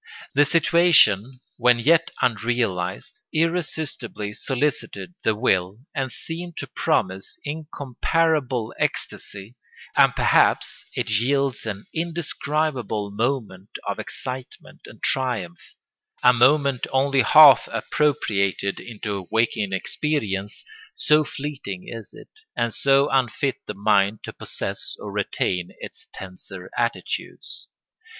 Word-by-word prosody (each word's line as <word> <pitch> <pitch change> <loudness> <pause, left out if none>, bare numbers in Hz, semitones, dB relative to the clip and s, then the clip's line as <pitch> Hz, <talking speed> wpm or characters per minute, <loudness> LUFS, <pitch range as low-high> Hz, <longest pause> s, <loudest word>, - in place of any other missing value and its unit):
The 145 - +5
situation, 145 - +4 0.2
when 125 -1 +4
yet 165 +7 +3
unrealised, 110 -6 -1
irresistibly 155 -10 -1
solicited 145 +8 -2
the 110 - +2
will 95 -4 +1 0.2
and 130 -1 -2
seemed 170 +4 -7
to - - -3
promise 95 +1 -1
incomparable 145 -3 -1
ecstasy; 100 +3 -3 0.4
and - - +5
perhaps - - +2
it 105 - -2
yields 130 +3 +1
an 100 -1 -5
indescribable 150 -9 -1
moment 105 -4 -3
of - - -2
excitement 130 0 -7
and - - -15
triumph—a 125 0 -1
moment 135 +1 +3
only 135 0 +3
half 145 +3 +8
appropriated 100 - 0
into 105 -5 -6
waking 110 -3 +1
experience, 105 -2 -2 0.3
so 150 +1 +3
fleeting 135 -11 -6
is 115 -3 -8
it, 435 - -15 0.2
and 120 -2 0
so 140 +1 +3
unfit 135 +1 +1
the 105 - -5
mind 100 0 +2
to - - -7
possess - - -4
or - - -7
retain 90 -1 -1
its - - -8
tenser 95 0 -9
attitudes. 115 0 -4
125 Hz, 105 wpm, -23 LUFS, 105-145 Hz, 0.4 s, half